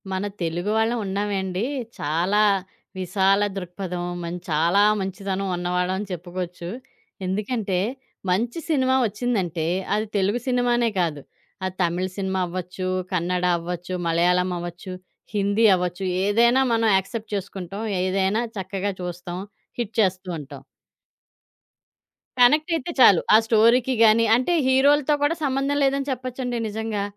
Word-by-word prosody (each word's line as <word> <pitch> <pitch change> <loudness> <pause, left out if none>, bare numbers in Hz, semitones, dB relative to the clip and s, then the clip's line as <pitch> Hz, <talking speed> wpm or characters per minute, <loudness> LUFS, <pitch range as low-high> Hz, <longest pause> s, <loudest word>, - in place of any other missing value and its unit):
మన 190 +1 -2 0.2
తెలుగు 170 +3 -2
వాళ్ళం 225 +2 +1
ఉన్నామే 200 +1 -2
అండి, 185 +1 -2 0.4
చాలా 175 +8 +1 0.6
విశాల 195 +2 +2
దృక్పథం, 180 -1 -5 0.2
మన్ 170 +1 -4
చాలా 165 +6 +3 0.2
మంచితనం 195 0 -3
ఉన్నవాళ్ళని 180 +2 -1
చెప్పుకోవచ్చు. 175 0 -5 0.6
ఎందుకంటే 200 0 -1 0.5
మంచి 230 - 0
సినిమా 260 -4 +2
ఒచ్చిందంటే 195 -7 -2 0.3
అది 215 +1 -1
తెలుగు 200 +5 +1
సినిమానే 245 -2 +2
కాదు. 160 -5 -1 0.4
అది 185 0 -4
తమిళ్ 175 +2 -1
సినిమా 190 -1 -1
అవొచ్చు, 185 +1 -5 0.2
కన్నడ 180 0 0
అవొచ్చు, 175 +1 -5
మలయాళం 180 +2 +2
అవొచ్చు, 175 +2 -7 0.4
హిందీ 205 +2 +2
అవొచ్చు, 180 +1 -3 0.2
ఏదైనా 235 +5 +4
మనం 225 -1 +2
యాక్సెప్ట్ 220 +4 -5
చేసుకుంటాం. 195 +1 -5 0.2
ఏదైనా 190 +4 +1
చక్కగా 195 +1 -3
చూస్తాం. 175 0 -5 0.4
హిట్ 230 -2 -3
చేస్తూ 185 -1 0
ఉంటాం. 140 -2 -10 1.8
కనెక్ట్ 300 +7 +5
అయితే 325 +2 -3
చాలు. 200 -8 +7
ఆ - - +10
స్టోరీకి 235 +3 +4
గాని, 225 +1 +5
అంటే 255 +8 +1
హీరోలతో 285 +3 +4
కూడా 295 +3 +2
సంబంధం 275 +1 0
లేదని 275 +1 +1
చెప్పొచ్చండి 250 -1 -3
నిజంగా. 215 -1 -3
195 Hz, 120 wpm, -23 LUFS, 180-230 Hz, 1.8 s, ఆ